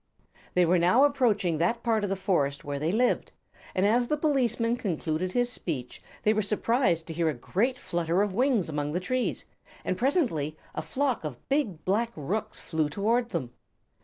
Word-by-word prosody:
They 180 -1 +5
were 175 +1 +3
now 185 +11 +5
approaching 225 - +2
that 230 +8 +1
part 225 -3 +1
of 205 - -1
the 195 - 0
forest 170 -8 0
where 145 -1 -3
they 155 +3 0
lived, 245 +5 +1 0.4
and 185 - +2
as 240 +4 +3
the 300 - 0
policeman 240 -6 +1
concluded 180 -4 -2
his 245 0 +1
speech 130 - -4 0.2
they 215 - +4
were 215 - +1
surprised 205 -4 +1
to 165 - -6
hear 165 0 +1
a 150 - -2
great 225 - 0
flutter 175 0 0
of 205 -2 -2
wings 245 -3 +2
among 150 -1 -2
the 180 - +1
trees, 255 +7 -2 0.4
and 185 - 0
presently 230 - +1 0.2
a - - -3
flock 260 - -1
of 145 -6 -7
big 270 - 0
black 225 +5 +1
rooks 180 +9 -3
flew 160 -2 -1
toward 230 +8 +1
them. 130 - -4
195 Hz, 185 wpm, -28 LUFS, 160-240 Hz, 0.4 s, They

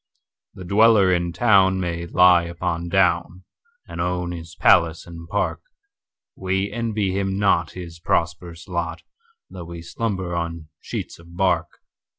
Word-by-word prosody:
The 95 - -9
dweller 100 -1 +5
in 85 -1 0
town 95 -3 +3
may 85 -1 -3
lie 90 0 +5
upon 85 0 -3
down, 90 0 +1 0.4
And - - -5
own 90 0 -2
his 85 -1 -8
palace 85 -3 +3
and 85 -1 -11
park:We 100 - -5
envy 110 -4 -1
him 95 0 -1
not 95 -5 +1
his 85 -2 -9
prosperous 85 +1 -2
lot, 85 -2 -4 0.5
Though 90 -2 -8
we 85 0 -9
slumber 95 -2 -3
on 85 -2 -4
sheets - - -6
of 85 +1 -15
bark. 90 -3 0
90 Hz, 135 wpm, -22 LUFS, 85-95 Hz, 0.5 s, dweller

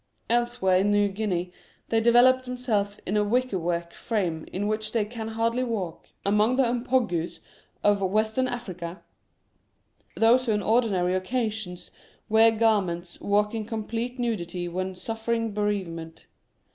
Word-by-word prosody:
Elsewhere 240 -6 +2
in 195 +2 +2
New 205 0 +3
Guinea 185 -3 -2 0.4
they 225 - +2
envelop 245 +3 +5
themselves 225 -5 -1
in 200 - -1
a 210 - +3
wicker 240 -1 +1
work 170 0 -2
frame 180 -9 -2
in 195 +3 -2
which 215 0 -2
they 225 -3 +2
can 220 0 -6
hardly 230 +2 0
walk. 200 -9 -4 0.2
Among 210 +4 +3
the 270 - +4
Mpongues 235 -8 0 0.5
of 205 -1 +3
Western 220 +6 +1
Africa, 185 -8 -6 1.1
those 240 +3 +4
who 220 - +3
on 210 -1 0
ordinary 205 -6 +2
occasions 210 -2 -3 0.4
wear 220 +1 +6
garments 200 -6 0
walk 210 +1 +1
in 225 -1 -2
complete 230 +3 -4
nudity 180 -7 -2
when 185 +2 -3
suffering 225 +2 -2
bereavement. 185 -6 -3
215 Hz, 135 wpm, -26 LUFS, 185-230 Hz, 1.1 s, wear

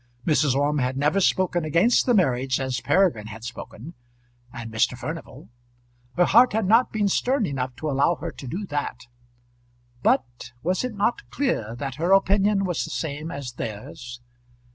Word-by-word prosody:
Mrs. 150 -4 +2
Orme 145 +1 +1
had 130 +1 -1
never 150 +7 +2
spoken 180 -2 +1
against 170 - +3
the 245 - +4
marriage 130 -7 +1
as 130 -1 -2
Peregrine 145 - +2
had 110 +1 -9
spoken, 120 +4 -8 0.6
and 115 -2 -8
Mr. 110 +3 +1
Furnival. 155 -2 -7 0.7
Her 175 - +5
heart 240 +5 +5
had 220 -1 +1
not 225 +6 +4
been 210 -2 +1
stern 250 +4 +1
enough 130 -5 -3
to 145 +5 -5
allow 140 +5 +2
her 165 +2 -6
to 135 - -10
do 185 +10 -4
that. 145 -6 -4 1.0
But 120 0 0
was 180 +6 0
it 250 -3 -4
not 205 +4 -1
clear 120 - -1
that 135 +1 -5
her 175 +3 +3
opinion 195 +1 +3
was 175 -4 -1
the - - -6
same 155 0 -4
as 140 -5 -6
theirs? 120 +3 -7
150 Hz, 165 wpm, -24 LUFS, 125-195 Hz, 1.0 s, Her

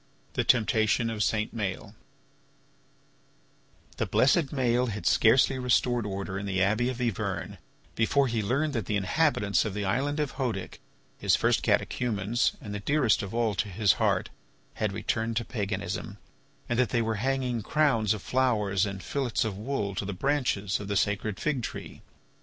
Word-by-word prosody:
THE - - 0
TEMPTATION 110 0 +2
OF 110 -2 -3
SAINT 110 +1 0
MAËL 100 -1 -4 2.0
The - - -1
blessed 145 +3 +3
Maël 125 -3 +1
had 105 -1 -5
scarcely 130 +3 +4
restored 120 -2 +1
order 95 -1 -4
in 100 - -5
the 95 -1 -1
Abbey 110 +6 +2
of 125 -1 -5
Yvern 100 -7 -3 0.3
before 135 +5 +2
he 115 -2 -1
learned 140 +8 0
that 115 -7 -2
the 105 - 0
inhabitants 100 - +2
of 105 -3 -4
the 105 -1 -2
island 135 +9 0
of 150 -2 -2
Hœdic, 115 -8 -3 0.4
his - - +3
first - - +2
catechumens 115 -1 0
and 105 - -7
the 105 - -3
dearest 135 +1 +2
of 100 +2 -6
all 115 -2 +1
to 105 +1 -1
his 100 +2 +3
heart, - - +1 0.4
had 105 -2 -1
returned 110 +2 -2
to 120 - -1
paganism, 100 -2 -4 0.5
and 120 -2 -1
that 125 -4 +3
they 115 +2 +1
were 110 -1 -1
hanging 130 -2 0
crowns 115 -5 +2
of 105 - -9
flowers 105 -7 +1
and 95 -2 -6
fillets 120 - -1
of 105 -3 -3
wool 105 -2 -3
to 95 - -3
the 100 - -3
branches 105 -4 0
of 100 - -7
the 100 -1 0
sacred 105 +1 -1
fig 150 -5 0
tree. - - -7
110 Hz, 170 wpm, -28 LUFS, 100-125 Hz, 2.0 s, scarcely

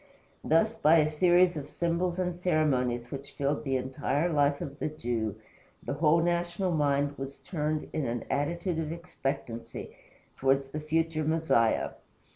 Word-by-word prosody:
Thus, 215 +9 +3
by 165 -6 +5
a 150 -1 +4
series 175 +2 +4
of 145 -2 -6
symbols 170 +1 -1
and 180 -1 -1
ceremonies 130 -9 +1
which 140 0 -7
filled 140 +1 -1
the 135 -2 +1
entire 135 +5 -1
life 145 -1 +3
of 140 +1 -6
the - - -1
Jew, 115 -8 -2 0.5
the - - -3
whole 160 +3 +3
national 175 +2 0
mind 145 -2 +1
was 135 +1 -6
turned 155 -2 -2
in 155 -4 -1
an 120 0 -2
attitude 170 +4 -1
of 155 -1 -2
expectancy 135 -8 -5 0.4
towards 135 0 +2
the 150 - -4
future 160 +1 0
Messiah. 155 -8 +2
150 Hz, 150 wpm, -29 LUFS, 135-170 Hz, 0.5 s, by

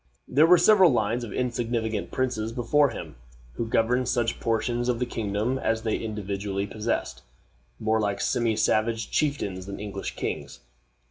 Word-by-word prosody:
There 150 +5 +4
were 180 +1 +7
several 185 -1 +6
lines 120 -1 0
of 115 - -6
insignificant 115 -3 -2
princes 125 -4 -1
before 130 +5 +2
him, 80 - -8 0.4
who 115 - -3
governed 125 +3 +1
such 120 -2 0
portions 120 +2 0
of 120 - +1
the 125 - -1
kingdom 110 +2 -2
as 115 -3 0
they 110 -2 0
individually 100 -2 -3
possessed, 110 +3 -3 0.6
more 110 +1 +1
like 100 -1 -1
semi 120 -3 +1
savage 110 +1 +1
chieftains 100 -11 -1
than 100 - -6
English 100 -1 -5
kings. - - -5
115 Hz, 150 wpm, -26 LUFS, 105-125 Hz, 0.6 s, were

